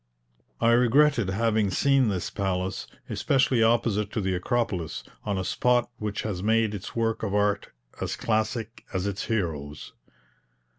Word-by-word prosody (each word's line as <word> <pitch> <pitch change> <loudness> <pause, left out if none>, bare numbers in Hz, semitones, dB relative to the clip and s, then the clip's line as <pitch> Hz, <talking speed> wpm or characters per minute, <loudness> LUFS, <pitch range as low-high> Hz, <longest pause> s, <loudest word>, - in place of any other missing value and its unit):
I 115 - +4
regretted 120 -1 +4
having 110 0 +1
seen 135 +6 +3
this 95 -3 -2
palace, 95 -2 -2 0.2
especially 130 -3 +2
opposite 110 -2 +2
to - - -1
the 95 -1 0
Acropolis, 90 - -1 0.2
on 100 -2 -1
a 95 - -1
spot 120 +3 +1
which 105 -1 -3
has 100 -5 -3
made 110 +1 +2
its 100 -2 -7
works 115 -1 0
of 100 -2 -1
art 105 0 +1 0.3
as - - -2
classic 110 +1 -2
as 95 0 0
its 100 -1 -3
heroes. 75 -9 -3
110 Hz, 145 wpm, -26 LUFS, 95-115 Hz, 0.3 s, I